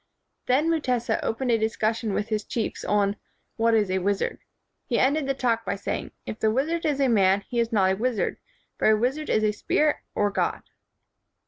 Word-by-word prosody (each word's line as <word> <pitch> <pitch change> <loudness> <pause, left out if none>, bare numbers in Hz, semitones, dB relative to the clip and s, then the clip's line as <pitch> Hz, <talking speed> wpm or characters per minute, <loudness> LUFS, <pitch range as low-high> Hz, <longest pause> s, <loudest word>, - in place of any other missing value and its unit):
Then 270 +6 +3
Mutesa 250 -8 0
opened 245 +2 -1
a 225 - +3
discussion 220 0 -1
with 210 - -2
his 215 -1 -1
chiefs 230 - -3
on 205 0 +1 0.4
"What 230 0 +3
is 205 -4 +2
a 190 - +1
wizard?" 200 +1 -1 0.5
He 240 - 0
ended 280 +2 +2
the 275 - 0
talk 235 -3 0
by - - -2
saying, 200 - -4 0.2
"If 215 - -6
the 220 - +2
wizard 315 +9 0
is 290 -2 0
a 275 - +3
man, 200 -4 +3
he 235 +4 -4
is 230 0 0
not 190 -4 +3
a - - +1
wizard; 235 +2 -1 0.4
for - - +4
a 215 - +5
wizard 270 +7 -1
is 215 - +2
a 215 - +3
spirit 300 +8 +1 0.2
or 205 0 +1
god." - - -1
225 Hz, 200 wpm, -25 LUFS, 210-255 Hz, 0.5 s, a